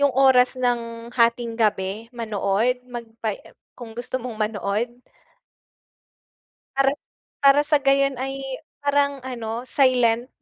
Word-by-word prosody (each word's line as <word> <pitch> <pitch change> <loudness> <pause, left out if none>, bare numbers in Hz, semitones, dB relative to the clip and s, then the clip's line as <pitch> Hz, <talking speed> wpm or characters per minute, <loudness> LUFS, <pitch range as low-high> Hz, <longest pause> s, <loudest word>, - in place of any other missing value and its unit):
'yung 285 -1 +4
oras 260 -1 +5
ng 235 -1 -2
hatinggabi 230 -3 +1
manood, 225 +2 0
magpa 230 -3 -5
em, - - -18 0.2
kung 235 -3 -9
gusto 245 +2 -3
mong 235 -3 -6
manood? 210 +1 -1 1.9
Para 275 0 +4 0.5
para 280 0 +6
sa 295 -1 +3
gayon 275 -1 +2
ay 270 +1 -4 0.4
parang 285 -2 +1
ano, 235 -2 -4
silent. 250 -3 +3
245 Hz, 110 wpm, -23 LUFS, 225-270 Hz, 1.9 s, para